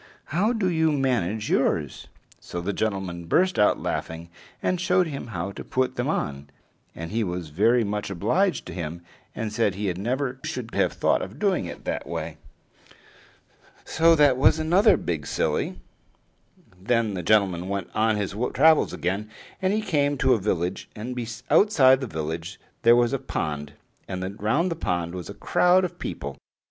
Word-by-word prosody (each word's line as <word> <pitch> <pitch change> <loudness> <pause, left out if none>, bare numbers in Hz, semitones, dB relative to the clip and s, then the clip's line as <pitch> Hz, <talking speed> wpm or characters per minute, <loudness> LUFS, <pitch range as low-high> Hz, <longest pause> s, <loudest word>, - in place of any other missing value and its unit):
How 200 +8 +2
do 220 -6 0
you 160 -3 +2
manage 115 - 0
yours?" - - 0 0.3
So 90 - -6
the 95 +4 -2
gentleman 95 -6 -3
burst 185 - +2
out 105 - +4
laughing, 80 +1 -4 0.3
and 180 -1 -1
showed 180 0 +3
him 140 -6 -6
how 105 -3 -4
to - - -8
put 130 0 -1
them - - -1
on; 70 0 -3 0.5
and 80 0 -6
he 115 +1 0
was 90 -4 -4
very 115 +10 +3
much 105 0 -3
obliged 175 - 0
to 90 - -8
him, 85 0 -5 0.3
and 110 -2 -4
said 105 -4 +1
he 100 -2 -1
never 130 +7 -2
should 120 -2 -5
have - - +1
thought - - +1
of - - -7
doing - - +1
it - - -9
that - - -3
way. - - -4 1.5
So 165 +1 +4
that 145 -4 +4
was 135 - +5
another 175 +7 +4
big 80 -5 -3
silly. - - -1 1.0
Then 115 0 +1
the 90 - -3
gentleman 95 -2 +2
went 100 -3 -3
on 110 0 +2
his 100 -2 -3 0.2
travels 155 +3 +5
again; 100 +5 -2 0.3
and 190 0 +2
he 215 +1 +1
came 145 -7 +1
to 130 -1 +3
a 115 - +1
village, 90 -2 -2
and 115 +4 -5 0.4
outside 135 -11 +5
the 130 - -3
village 80 +2 -5 0.2
there 120 0 +6
was 120 +1 +2
a 135 - 0
pond, 75 - -4 0.3
and 95 +2 -5
round 150 - +1
the - - -1
pond 85 - -2
was 90 -3 -6
a - - -7
crowd 180 +1 +3
of 180 - -7
people. 70 -1 -5
110 Hz, 170 wpm, -25 LUFS, 90-145 Hz, 1.5 s, there